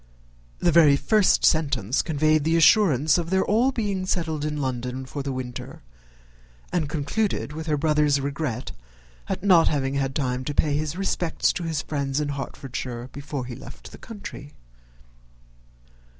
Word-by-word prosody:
The 175 - +2
very 155 -3 +6
first 210 +7 +3
sentence 140 -7 +2
conveyed 155 -1 +2
the 160 +2 +2
assurance 160 - +5
of 165 -1 -4
their 190 +1 +2 0.3
being 205 -6 -2
all 185 - -4
settled 160 -5 -1
in 150 0 -2
London 130 -1 -3
for 140 +2 -5
the 140 0 -3
winter, 125 -2 -7 0.9
and 160 -5 0
concluded 160 +4 -2
with 160 +1 -6
her 150 -1 +1
brother's 150 -1 +2
regret 140 -3 -3 0.6
at - - -3
not 180 -5 +6
having 135 -2 0
had 135 -1 -1
time 130 -3 -1
to 145 - -3
pay 145 -2 +2
his 155 +1 -2
respects 180 -3 0
to 175 - -4
his 160 -2 -2
friends 140 -2 -2
in 150 -1 -2
Hertfordshire 130 -3 -5
before 140 -2 -5
he 125 - -7
left 130 - -12
the - - -12
country. 200 -9 -9
150 Hz, 155 wpm, -24 LUFS, 135-165 Hz, 0.9 s, very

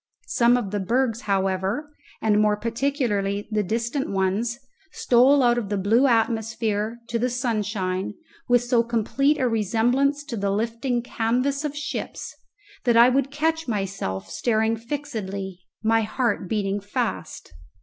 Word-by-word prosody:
Some 240 +1 +4
of 210 -6 -3
the 205 - -1
bergs, 235 +3 0
however, 195 +9 0 0.3
and 210 -1 +3
more 210 -1 +3
particularly 230 -4 -1
the 215 -1 +1
distant 235 +7 -2
ones, 200 +5 0 0.4
stole 260 +3 +4
out 240 0 +4
of 210 -4 -5
the 205 - 0
blue 225 +8 +3
atmosphere 225 -1 0
to 230 - -1
the 250 +2 +1
sunshine 210 -6 -2 0.3
with 245 -1 +4
so 245 -1 +3
complete 235 +6 +1
a 255 - +2
resemblance 240 +6 +1
to 285 -5 -6
the 200 -2 -1
lifting 230 +4 -1
canvas 250 +5 0
of 295 -1 -3
ships 300 - -5 0.5
that 240 -2 +3
I 235 +2 +8
would 270 +1 +1
catch 320 +2 -1
myself 195 - -3
staring 220 -1 +1
fixedly, 215 -7 -5 0.2
my 225 +1 +3
heart 215 -4 -1
beating 205 -2 0
fast. 200 - -4
230 Hz, 140 wpm, -24 LUFS, 205-250 Hz, 0.5 s, I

